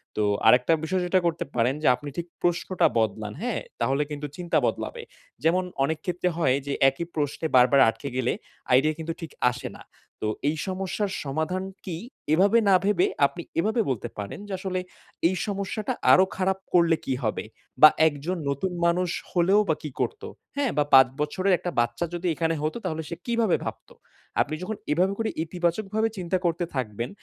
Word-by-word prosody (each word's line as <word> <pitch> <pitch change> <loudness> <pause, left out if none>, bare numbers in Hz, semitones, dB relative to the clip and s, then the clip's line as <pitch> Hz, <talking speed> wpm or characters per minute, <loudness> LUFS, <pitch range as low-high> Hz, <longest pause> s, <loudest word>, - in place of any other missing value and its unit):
তো 105 - +1 0.2
আরেকটা 125 +7 +6
বিষয় 185 +3 0
যেটা 185 +1 +3
করতে 165 -1 0
পারেন 125 +3 +2
যে - - +3
আপনি 145 +3 -8
ঠিক 170 0 -3
প্রশ্নটা 175 +1 +2
বদলান। 110 -1 -1
হ্যাঁ 240 -2 -1 0.2
তাহলে 135 +5 +2
কিন্তু 150 0 -4
চিন্তা 175 -2 0
বদলাবে। 480 - -3 0.4
যেমন 180 +3 +3 0.2
অনেক 160 +3 0
ক্ষেত্রে 180 0 0
হয় 135 -6 +3
যে 140 - -1 0.2
একই 135 +6 -5
প্রশ্নে 150 +1 -1
বারবার 130 +2 +6
আটকে 140 +5 -5
গেলে 125 -1 +1 0.4
আইডিয়া 150 +5 +4
কিন্তু 165 +1 -3
ঠিক 165 -3 -7 0.2
আসে 125 +1 -6
না। - - -13 0.4
তো 110 - -1 0.2
এই 155 - -2
সমস্যার 190 +2 -2
সমাধান 160 +6 -2 0.2
কি? 175 -4 -4 0.4
এভাবে 195 +7 +5
না 190 - +7
ভেবে 200 -3 +3 0.2
আপনি 170 +5 -3 0.2
এভাবে 220 +6 +2
বলতে 125 -5 -2
পারেন 100 - -6
যে, - - -9
আসলে 185 -1 -2 0.5
এই 185 - 0
সমস্যাটা 205 +4 -2 0.2
আরো 185 - +7
খারাপ 190 0 +1 0.2
করলে 170 -2 +5
কি 135 - 0
হবে? 110 - -1 0.4
বা 155 - +12 0.2
একজন 155 +5 -2
নতুন 140 +7 -1
মানুষ 175 +1 +2 0.2
হলেও 185 +3 +4
বা 160 - +3
কি 150 - -4
করতো? 440 0 -3 0.3
হ্যাঁ 280 -3 +1
বা 150 - +4
৫ 130 -1 +9
বছরের 185 +6 +1
একটা 175 - -4
বাচ্চা 120 +8 0
যদি 175 +1 -2
এখানে 165 0 0
হতো 155 +8 -1
তাহলে 160 0 -2
সে 170 - -4
কিভাবে 230 -5 +2
ভাবতো। - - -7 0.5
আপনি 155 +2 -1
যখন 210 +4 -3 0.2
এভাবে 180 +6 +2
করে 225 -1 0
ইতিবাচকভাবে 190 +6 -1
চিন্তা 185 +1 -1
করতে 170 +1 +1
থাকবেন, 115 -2 -3
170 Hz, 180 wpm, -26 LUFS, 145-185 Hz, 0.5 s, বা